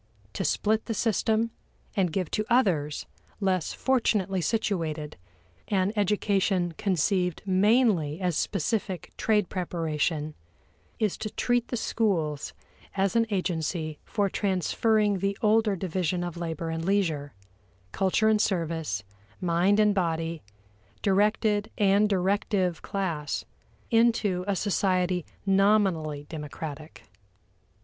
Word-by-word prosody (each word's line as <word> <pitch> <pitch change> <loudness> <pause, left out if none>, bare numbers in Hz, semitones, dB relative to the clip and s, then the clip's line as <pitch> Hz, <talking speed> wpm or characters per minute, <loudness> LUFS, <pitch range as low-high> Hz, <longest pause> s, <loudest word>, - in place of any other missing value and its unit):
To - - -2
split 220 +1 +1
the 225 - -3
system, 225 +1 +1 0.4
and 185 -5 +1
give 180 0 -2
to 215 - 0
others, 175 - +2 0.3
less 185 -4 0
fortunately 210 -7 +1
situated, 165 -8 -1 0.5
an 195 0 +1
education 195 -3 +1
conceived 180 -2 0
mainly 190 - +3
as 180 -3 0
specific 195 -3 -2
trade 210 -4 +2
preparation, 160 -3 -2 0.6
is 215 -4 0
to 215 - -3
treat 245 +2 0
the 245 - -3
schools 170 -11 -1 0.4
as 195 +2 +1
an 230 0 +3
agency 165 -5 -2
for 205 -2 0
transferring 205 +2 +1
the 195 +1 -1
older 215 -1 +3
division 180 -1 -1
of 175 -2 -4
labor 165 -1 -4
and 165 0 -3
leisure, 165 - 0 0.6
culture 195 - +2
and 215 -1 +4
service, 160 - -1 0.4
mind 180 +4 +2
and 210 -1 +4
body, 165 -3 -1 0.6
directed 210 +1 +2
and 205 +1 +4
directive 190 -2 0
class, 170 -7 -3 0.5
into 225 -5 +3
a 200 - +1
society 185 -3 0 0.2
nominally 195 -7 +2
democratic. 155 0 -7
190 Hz, 110 wpm, -27 LUFS, 165-210 Hz, 0.6 s, and